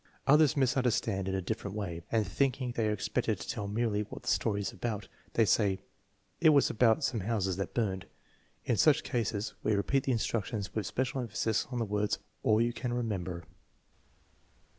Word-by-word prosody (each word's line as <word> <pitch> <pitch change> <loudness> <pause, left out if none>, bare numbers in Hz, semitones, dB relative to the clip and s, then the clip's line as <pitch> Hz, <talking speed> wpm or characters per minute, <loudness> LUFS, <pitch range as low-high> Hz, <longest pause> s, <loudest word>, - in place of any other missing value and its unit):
Others 150 +1 +5
misunderstand 120 -7 +1
in 95 - -1
a 95 - -2
different 105 0 -4
way, 85 -5 -4
and 110 -2 +2
thinking 130 +5 0
they 115 -2 0
are - - +1
expected 105 - -1
to - - -7
tell 100 - -3
merely 105 0 0
what 105 - -8
the - - -2
story 105 -2 +1
is 100 - -2
about, 105 -4 -4 0.3
they 115 - +5
say: 100 -2 +2 0.3
" - - -41
It 160 - +7
was 145 -2 +5
about 115 +5 +3
some 115 - 0
houses 95 -3 -1
that 100 - -4
burned/ 95 -6 -1 0.6
5 - - -1
In 115 - +2
such 155 +4 +5
cases 110 -4 -2
we 110 - +1
repeat 130 +7 +1
the 135 - +1
instructions 110 -3 -2
with 110 -3 -2
special 130 +1 -1
emphasis 110 -1 -1
on 125 - -2
the 115 - 0
words 105 0 0 0.2
all 110 0 +3
you 120 +1 +2
can 125 0 -3
remember. 95 -8 -2
110 Hz, 190 wpm, -31 LUFS, 100-120 Hz, 0.6 s, It